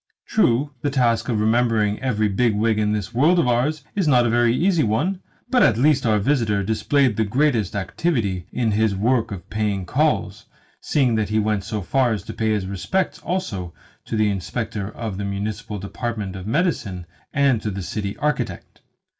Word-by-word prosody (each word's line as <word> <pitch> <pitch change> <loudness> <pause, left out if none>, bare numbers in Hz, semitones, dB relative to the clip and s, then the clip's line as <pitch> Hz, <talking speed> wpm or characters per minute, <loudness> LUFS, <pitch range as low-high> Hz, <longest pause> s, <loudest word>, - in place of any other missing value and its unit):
True, 145 - +2
the 145 - 0
task 125 -4 +1
of 110 -3 +1
remembering 110 -1 +2
every 110 -5 0
big 105 +2 +1
wig 110 +1 +1
in 105 0 +1
this 105 +1 -3
world 155 +9 +4
of 170 - +3
ours 135 +5 +1
is 195 -5 +1
not 125 -4 +4
a 115 - +1
very 120 0 +3
easy 170 +6 +2
one; 150 - 0 0.3
but 250 0 +3
at 115 - +4
least 135 -1 +3
our 110 -1 +3
visitor 105 -3 +1
displayed 115 +4 +1
the 110 - +3
greatest 115 -3 +1
activity 100 - -1
in 115 -3 0
his 105 -1 +1
work 115 +4 +1
of 95 -2 -7
paying 105 -3 -1
calls, 110 - 0 0.3
seeing 130 -5 +1
that 110 -2 0
he 110 - 0
went 105 -2 0
so 105 -1 -4
far 125 +4 +2
as 100 -4 -4
to - - -7
pay 110 -1 -1
his 105 -3 0
respects 100 - -2
also 100 - -4 0.3
to - - -4
the 105 -1 +3
Inspector 100 +1 -4
of 110 -5 -5
the - - -2
Municipal 105 +2 -4
Department 100 0 -4
of 95 +1 -7
Medicine 110 - -1 0.3
and 135 -5 +2
to 110 - -2
the 100 -1 -5
City 100 +1 -4
Architect. 150 -2 -3
110 Hz, 190 wpm, -22 LUFS, 105-130 Hz, 0.3 s, world